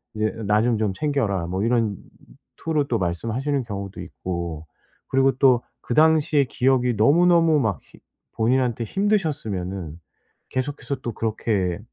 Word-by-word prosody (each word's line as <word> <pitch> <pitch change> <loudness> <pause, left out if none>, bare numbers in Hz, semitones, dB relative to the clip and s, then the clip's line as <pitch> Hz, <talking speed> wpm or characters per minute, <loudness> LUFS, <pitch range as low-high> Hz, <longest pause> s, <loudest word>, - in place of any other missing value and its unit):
이제 110 0 0 0.2
"나 105 +1 +3
좀 120 -1 +2
좀 105 -2 0
챙겨라." 105 - -1
뭐 95 +3 -2
이런 115 -3 +1 0.6
투로 155 -3 -1
또 120 - 0
말씀하시는 115 - -1
경우도 100 -3 -6
있고. 85 -3 -5 0.4
그리고 135 0 +3
또 130 -3 +5 0.3
그 - - -1
당시의 155 -2 +4
기억이 125 -1 +1
너무너무 165 - +4
막 105 - -1
힘 - - -20 0.3
본인한테 120 0 +1
힘드셨으면은 110 - -2 0.5
계속해서 140 +2 -3
또 120 - -4
그렇게 105 -5 -1
115 Hz, 295 characters per minute, -23 LUFS, 100-140 Hz, 0.6 s, 또